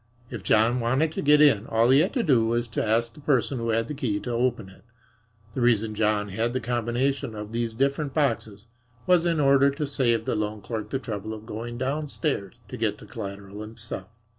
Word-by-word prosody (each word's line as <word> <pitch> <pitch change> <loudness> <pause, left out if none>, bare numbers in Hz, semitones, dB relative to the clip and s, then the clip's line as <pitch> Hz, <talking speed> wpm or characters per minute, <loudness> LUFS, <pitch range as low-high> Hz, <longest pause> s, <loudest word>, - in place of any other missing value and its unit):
If 120 -5 -5
John 110 +5 +3
wanted 130 +7 +1
to - - -3
get 150 +1 +5
in, 115 -8 +5
all 115 +2 +3
he 135 - +6
had 175 +6 +2
to 250 -4 +1
do 130 - +4
was 120 +1 0
to 115 - -1
ask 115 +2 +1
the - - -15
person 135 -3 +1
who 115 0 -2
had 115 0 +1
the - - -4
key 120 -8 -1
to 125 - -4
open 120 -3 0
it. 95 - -18 0.7
The 130 - -3
reason 115 -2 +2
John 105 -1 +1
had 115 +5 -1
the 130 - 0
combination 120 +2 -1
to 105 -1 -5
these 115 +1 -3
different 140 +3 0
boxes 115 -8 -1 0.4
was 175 -2 +4
in 165 -2 +1
order 140 -1 +5
to 145 +2 -3
save 120 -5 +1
the - - 0
loan 105 0 -2
clerk 105 +1 -5
the 135 - -1
trouble 110 -3 -5
of 110 0 -11
going 120 +2 -6
downstairs 140 - -2
to - - -6
get - - -1
the - - -13
collateral 100 -1 -7
himself. 110 -3 -7
120 Hz, 215 wpm, -26 LUFS, 110-135 Hz, 0.7 s, he